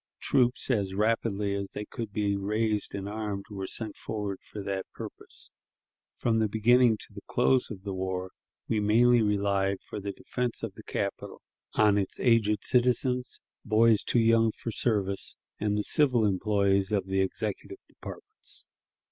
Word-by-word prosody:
Troops, 125 +1 +1
as 100 -5 0
rapidly 105 -1 +1
as 100 -1 -3
they 105 - -4
could 115 -1 -6
be 100 -1 0
raised 105 +2 -1
and 100 0 -4
armed, 105 -2 -4
were 95 -2 -4
sent 110 0 -4
forward 105 -3 -4
for 105 - -8
that 95 -1 -3
purpose. - - -8 0.7
From 115 -2 +1
the 110 - +3
beginning 115 +2 +4
to - - -10
the 100 - -9
close 125 +1 +2
of 95 -4 -8
the 100 -1 -4
war, 95 0 -3 0.4
we 110 - +1
mainly 115 +3 +5
relied 100 -2 +1
for - - -5
the 100 0 -4
defense 125 +3 -3
of - - -3
the - - -11
capital - - -4 0.3
on 105 -1 +4
its 95 - -2
aged 110 -4 +3
citizens, 125 0 +1 0.2
boys 110 0 +4
too - - 0
young 115 -1 +4
for 115 - -5
service, 100 -4 0 0.2
and 105 0 0
the 105 - 0
civil 125 -6 +3
employees 100 0 +2
of 100 -3 +1
the 95 0 +1
executive 95 - -3
departments. - - -8
105 Hz, 160 wpm, -28 LUFS, 100-115 Hz, 0.7 s, mainly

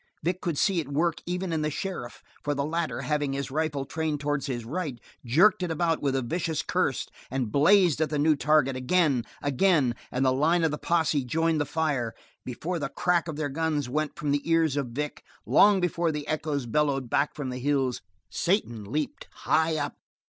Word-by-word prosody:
Vic 180 +3 -1
could 165 -4 -2
see 190 +1 +2
it 155 - -3
work 160 +3 0
even 180 0 -2
in 160 - 0
the 155 - 0
sheriff, 155 -6 -5 0.2
for 145 0 -1
the 140 0 -1
latter, 165 +2 -2
having 145 -2 -1
his 140 -1 -3
rifle 150 -2 -1
trained 155 0 -2
towards 145 -1 -1
his 120 -4 -3
right 145 -2 -4 0.2
jerked 175 - +4
it 180 - -1
about 165 0 0
with 140 -2 0
a 135 +6 -1
short 160 -3 -1
curse - - 0 0.2
and 130 -4 -2
blazed 170 - +4
at 155 - +1
the 150 - -1
new 155 +1 +4
target, 145 -2 +2
again, 135 -1 +2 0.2
again, 145 -2 +3 0.2
and 130 +2 0
the 130 - +4
line 165 +6 +2
of 160 - +2
the 150 - -4
posse 160 -4 +1
joined 160 +4 +1
the - - 0
fire. 145 -8 -1 0.3
Before 165 +8 -4
the 140 -2 -3
crack 175 +2 +1
of 160 - -4
their 150 -1 -2
guns 150 -1 -1
went 155 +3 -1
from 145 -1 -1
the 145 0 +1
ears 165 -3 +3
of 140 -3 -1
Vic, 145 +5 -5 0.2
long 205 -1 +5
before 175 -2 0
the 150 -1 -5
echoes 150 -3 -2
bellowed 135 +1 0
back 140 +5 0
from 140 -4 -4
the 125 - -5
hills, 135 -2 0 0.3
Satan 120 - -1
leaped 150 +1 -3
high 160 0 +1
up. - - -3
150 Hz, 200 wpm, -27 LUFS, 135-165 Hz, 0.3 s, long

